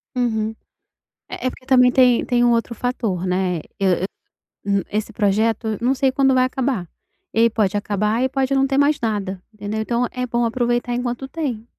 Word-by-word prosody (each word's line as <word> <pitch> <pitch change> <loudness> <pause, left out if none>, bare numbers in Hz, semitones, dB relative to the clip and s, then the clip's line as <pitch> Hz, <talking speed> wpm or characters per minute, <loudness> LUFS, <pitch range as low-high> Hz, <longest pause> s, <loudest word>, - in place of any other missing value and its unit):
Uhum. 220 -3 -1 0.7
É - - -5
é - - +2
porque 255 - -15
também 250 -1 +5
tem 250 -3 +4
tem 245 -1 +2
um 240 - +4
outro 235 0 0
fator, 220 -7 -2
né. 180 -1 0 0.2
E 195 - -1 0.8
e 200 0 +2
o - - -13
esse 215 +1 -2
projeto 220 +2 +1
eu 215 - -1
não 255 +3 +2
sei 265 -1 +1
quando 270 0 +3
vai 255 0 +4
acabar, 255 -9 -2 0.4
ele 230 +1 +4
pode 205 -3 0
acabar 210 +3 0
e 260 - +1
pode 270 0 0
não 270 0 +3
ter 270 0 0
mais 285 +1 +3
nada 200 -5 -2
entendeu? 210 +1 -4
Então 235 +2 0
é 250 0 -3
bom 240 0 0
aproveitar 240 +1 0
enquanto 245 +2 -3
tem. 260 -8 -4
235 Hz, 195 wpm, -21 LUFS, 215-255 Hz, 0.8 s, também